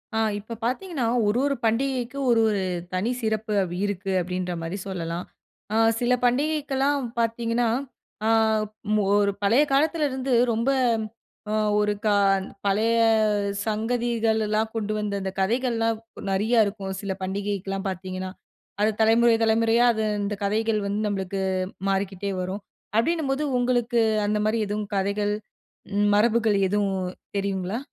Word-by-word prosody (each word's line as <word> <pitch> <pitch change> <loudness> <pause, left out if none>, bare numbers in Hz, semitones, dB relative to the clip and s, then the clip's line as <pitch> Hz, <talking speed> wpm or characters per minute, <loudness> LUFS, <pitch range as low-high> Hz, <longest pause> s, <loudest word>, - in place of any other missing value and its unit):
அ - - +1 0.2
இப்போ 220 +3 -8
பாத்தீங்கன்னா 270 +1 -2 0.2
ஒரு 210 +3 +2
ஒரு 280 -1 +1
பண்டிகைக்கும், 255 +3 0
ஒரு 230 -1 +4
ஒரு 205 -2 0 0.3
தனி 185 +5 0
சிறப்பு 220 -1 -1 0.3
இருக்கு! 200 -1 -3
அப்டின்ற 180 0 -3
மாரி 165 +4 -4
சொல்லலாம். 170 -2 -4 0.5
ஆ - - +2 0.2
சில 245 0 +2
பண்டிகைக்கெல்லாம் 280 +1 +1 0.2
பாத்தீங்கன்னா, 230 +1 0 0.6
ஆ - - +3 0.9
ஒரு 200 -1 +3
பழைய 230 +8 +5
காலத்துல 305 +2 +2
இருந்து 260 0 -2 0.2
ரொம்ப 230 +4 0 0.8
அ - - 0 0.3
ஒரு 210 0 +2
கா 210 - +4 0.5
பழைய 220 +4 +2 0.7
சங்கதிகள் 225 0 0
எல்லாம் 215 +1 0
கொண்டு 215 -1 -1
வந்து 210 -1 -2
அந்த 190 0 -3
கதைகள்லாம் 230 +1 0 0.3
நெறையா 220 +5 +2
இருக்கும். 195 -2 -4
சில 200 -2 -3
பண்டிகைக்கெல்லாம் 195 0 -3
பாத்தீங்கன்னா, 185 0 -5 0.5
அது 215 - +4
தலைமுறை 230 +1 +5
தலைமுறையா 225 +1 +3
அது 220 - -1 0.2
இந்த 205 +1 -2
கதைகள் 215 +1 +1
வந்து 200 +1 -1
நம்பளுக்கு 195 -1 -2 0.5
மாறிக்கிட்டே 195 0 -1
வரும். 190 +3 -4 0.4
அப்டின்னும்போது 295 +1 +1 0.2
உங்களுக்கு, 245 -1 +1 0.3
அந்த 210 +1 +1
மாரி 220 +1 +1
எதும் 210 +1 -2
கதைகள், 200 +1 0 0.8
மரபுகள் 220 -1 +3
எதுவும் 200 -1 0 0.4
தெரியுங்களா? 195 +2 -2
220 Hz, 125 wpm, -25 LUFS, 200-235 Hz, 0.9 s, பழைய